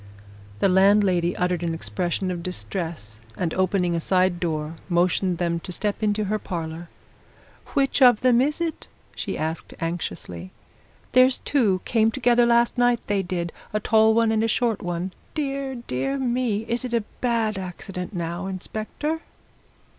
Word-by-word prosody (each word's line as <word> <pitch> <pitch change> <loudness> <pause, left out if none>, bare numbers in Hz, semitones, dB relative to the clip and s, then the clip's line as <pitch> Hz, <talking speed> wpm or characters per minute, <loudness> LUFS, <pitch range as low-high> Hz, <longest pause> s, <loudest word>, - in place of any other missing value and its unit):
The - - +5
landlady 190 -2 +4
uttered 180 -1 0
an 165 -1 -1
expression 180 +2 -2
of 175 -1 -4
distress, 170 - -5 0.2
and 170 -3 -1
opening 185 -2 +1
a - - 0
side 185 +1 +2
door, 155 -2 -2 0.2
motioned 180 +1 +2
them 170 -1 0
to 180 - -8
step 205 +4 -2
into 210 0 +1
her 210 +1 -1
parlour. 165 -2 -5 0.9
"Which 275 0 +2
of 245 -4 +7
them 250 -1 +5
is 295 +4 0
it?" 335 -2 -3 0.3
she - - -3
asked 160 +1 -4
anxiously. 165 - -4 0.6
"There's 255 0 +5
two 210 -10 +1
came 225 -1 +3
together 240 0 +3
last 235 +1 +3
night, 245 -1 +3
they 205 -1 +1
did 175 -2 -3 0.2
a 210 - +1
tall 220 +1 +4
one 230 -1 +3
and 220 0 +2
a - - +2
short 225 -1 +1
one. 175 +1 -3 0.2
Dear, 275 -3 -2
dear 240 - -2
me! 245 -4 0
is 235 +2 -1
it 245 -2 -2
a 230 - +1 0.3
bad 220 -3 0
accident, 180 0 -6
now, 175 0 -3
inspector?" 215 - -4
195 Hz, 155 wpm, -24 LUFS, 175-235 Hz, 0.9 s, of